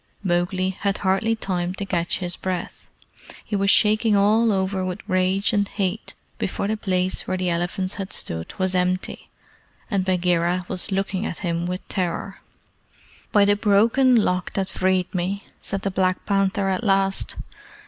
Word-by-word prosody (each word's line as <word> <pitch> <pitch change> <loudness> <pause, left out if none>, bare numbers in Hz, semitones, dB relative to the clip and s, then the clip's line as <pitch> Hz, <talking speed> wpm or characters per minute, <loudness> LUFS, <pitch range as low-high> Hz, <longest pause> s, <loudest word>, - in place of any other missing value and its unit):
Mowgli 185 +1 0
had 200 +1 -2
hardly 200 +4 +1
time 180 -4 -2
to 200 - -4
catch 175 -3 0
his 180 -2 -2
breath 185 -2 -5 0.6
he 210 - -3
was 195 0 +2
shaking 215 +1 +4
all 215 +3 +4
over 190 -1 0
with 185 +2 -5
rage 185 +2 +1
and 205 -1 +2
hate 200 +1 -3 0.2
before - - -2
the 215 - 0
place 185 -3 -1
where 185 - -1
the 180 -1 0
elephants 175 +2 -2
had 195 - -6
stood 80 0 -3
was 185 -1 0
empty, 185 0 -1 0.6
and 195 -2 +1
Bagheera 180 -1 +1
was 190 +2 +2
looking 195 0 -1
at 170 - -6
him 170 0 -1
with 180 +1 -5
terror. 185 +1 -3 0.9
"By 205 -2 +5
the 205 0 +4
Broken 225 +6 +4
Lock 180 -5 +1
that 195 -1 -1
freed 185 -1 0
me!" 190 +3 -2 0.2
said 195 - -4
the 195 - -1
Black 185 0 0
Panther 195 0 +1
at 190 +3 -1
last. 195 -2 +1
190 Hz, 160 wpm, -23 LUFS, 180-200 Hz, 0.9 s, By